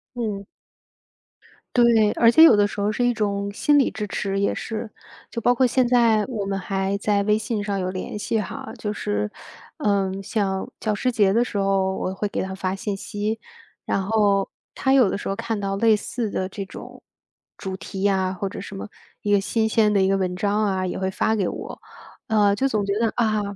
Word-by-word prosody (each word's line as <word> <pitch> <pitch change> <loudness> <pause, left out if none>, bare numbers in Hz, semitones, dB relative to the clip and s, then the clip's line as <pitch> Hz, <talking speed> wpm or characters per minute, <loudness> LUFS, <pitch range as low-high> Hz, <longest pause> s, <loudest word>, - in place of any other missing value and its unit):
嗯。 210 -4 -3 1.3
对， 230 -3 +5
而 230 - +5
且 320 +7 +7
有 325 - +9
的 205 0 +4
时 205 - -5
候 205 - +1
是 245 +3 0
一 245 - +3
种 200 -2 -1
心 290 +7 +3
理 270 - +3
支 210 -1 -4
持 195 0 -2
也 200 - +1
是， 220 0 -5 0.4
就 - - -4
包 245 +2 +3
括 260 - +3
现 250 0 +2
在 230 -4 +4
我 220 -6 -4
们 195 0 -2
还 195 +1 -1
在 200 0 +1
微 210 +1 +3
信 220 -1 -2
上 200 -1 -2
有 185 - -2
联 185 +3 -5
系 220 +1 0
哈， 265 +6 -7
就 210 - -3
是， 105 - -2 0.5
嗯， 195 -2 0
像 195 -2 -2
教 215 -2 0
师 250 +5 0
节 205 -4 +3
的 235 +3 +3
时 205 - -4
候 195 -1 +1
我 185 - -3
会 205 +2 -2
给 - - -3
他 190 0 -4
发 190 0 -2
信 195 0 -3
息， 210 +3 -3 0.5
然 195 - 0
后 205 -2 +2 0.3
他 265 - 0
有 255 -7 +5
的 - - -2
时 - - -5
候 195 - -1
看 230 -1 -2
到 195 -1 -2
类 220 +1 +4
似 220 +1 -3
的 185 -1 -2
这 195 +1 -6
种 190 - -11 0.6
主 190 -1 -5
题 190 0 -7
呀， 190 -2 +2
或 195 +1 -3
者 - - -7
什 200 - -8
么， 195 - -7 0.3
一 205 - -1
个 205 - +5
新 220 +3 0
鲜 215 -1 +3
的 200 - +3
一 190 - +3
个 195 - +2
文 180 -1 -1
章 205 +3 +1
啊， 190 -2 0
也 180 - -3
会 190 0 0
发 220 +3 0
给 190 - +1
我。 - - -6 0.5
呃， 210 -3 +3
就 265 +6 +1
总 215 -5 0
觉 200 - -1
得， 230 -2 +1
啊， 215 -3 +1
205 Hz, 235 characters per minute, -23 LUFS, 195-220 Hz, 1.3 s, 有